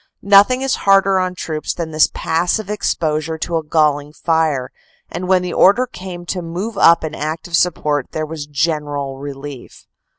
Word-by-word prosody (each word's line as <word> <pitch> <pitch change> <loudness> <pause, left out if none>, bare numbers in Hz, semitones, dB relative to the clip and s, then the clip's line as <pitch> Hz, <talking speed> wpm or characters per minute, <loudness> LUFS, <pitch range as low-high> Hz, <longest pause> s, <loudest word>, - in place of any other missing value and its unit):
Nothing 205 +6 +5
is 270 - 0
harder 195 -1 +5
on 185 0 -2
troops 155 -3 -4
than 165 -2 -4
this 155 0 +4
passive 180 +6 -1
exposure 160 -6 -1
to 165 +1 -2
a 160 - -3
galling 150 -1 +1
fire, 160 -6 0 0.4
and 180 - -4
when 185 -1 +3
the 180 - -4
order 205 +7 +4
came 180 -7 -9
to 180 +1 -3
move 180 +7 -5
up 170 -3 +5
in 155 -1 -4
active 160 +3 -4
support 150 -6 +1
there 155 0 -3
was 155 -2 -7
general 145 -2 -2
relief. 140 -1 -9
160 Hz, 165 wpm, -18 LUFS, 150-185 Hz, 0.4 s, Nothing